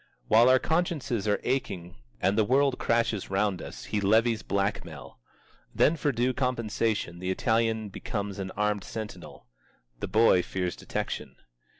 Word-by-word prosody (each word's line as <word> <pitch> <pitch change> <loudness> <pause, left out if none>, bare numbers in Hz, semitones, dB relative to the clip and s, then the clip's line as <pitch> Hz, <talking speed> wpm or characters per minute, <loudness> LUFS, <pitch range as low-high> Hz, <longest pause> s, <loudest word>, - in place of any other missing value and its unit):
While 115 +3 +6
our 130 - +7
consciences 150 - -1
are 105 - +2
aching 95 -9 -2 0.2
and 95 - +2
the 110 - +4
world 135 +3 +2
crashes 115 -3 0
round 95 -1 0
us, - - -8
he 105 - -1
levies 110 +3 +3
black 100 +1 -1
mail. - - -11 0.6
Then 155 - +4
for 150 -2 0
due 125 +1 0
compensation 115 -7 -1
the 90 +1 -3
Italian 110 +1 +1
becomes 100 0 -4
an 95 -1 -3
armed 105 -1 0
sentinel. 110 -2 -8 0.5
The - - -3
boy 110 -5 +5
fears 90 -1 -3
detection. - - -4
110 Hz, 145 wpm, -28 LUFS, 100-120 Hz, 0.6 s, our